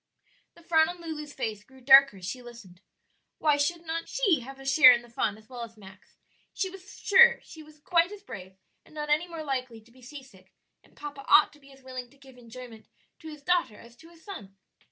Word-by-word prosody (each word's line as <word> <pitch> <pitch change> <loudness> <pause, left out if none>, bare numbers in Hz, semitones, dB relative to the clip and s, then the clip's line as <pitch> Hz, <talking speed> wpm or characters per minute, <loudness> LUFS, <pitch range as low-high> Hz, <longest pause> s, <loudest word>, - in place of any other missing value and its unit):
The 340 - -19
frown 320 -1 +3
on 355 0 -8
Lulu's 310 -3 -7
face 215 -6 -5
grew 265 +3 -20
darker 270 -3 +6
as 185 - -10
she 250 +7 -6
listened. 230 -7 -14 0.6
Why 300 -2 +2
should 330 +4 -2
not 330 +1 -4
she 400 - +1
have 270 +2 -11
a 270 - -12
share 270 0 +8
in 240 0 -2
the 240 - -18
fun 210 -3 -2
as 215 0 -20
well 245 -1 -9
as 230 -1 -9
Max? 190 -2 -17 0.4
she 380 -2 -2
was 385 +1 -13
sure 475 +4 +6
she 320 - -13
was 305 0 -17
quite 340 +3 +1
as 410 -1 -11
brave, 190 - -11 0.3
and - - -21
not 300 -1 -4
any 310 +4 +1
more 330 -2 -7
likely 255 -5 -4
to 230 +2 -24
be 255 +2 -21
seasick; 250 -8 -14 0.3
and - - -26
papa 290 -2 -8
ought 300 0 +5
to 295 - -20
be 275 -1 -19
as 270 -1 -19
willing 255 -1 -8
to 280 - -24
give 265 -2 -17
enjoyment 235 -1 -12 0.3
to 320 - -12
his 300 -2 -11
daughter 345 -11 0
as 235 0 -16
to 325 +1 -17
his 335 -1 -20
son. 200 - -10
275 Hz, 230 wpm, -27 LUFS, 235-320 Hz, 0.6 s, share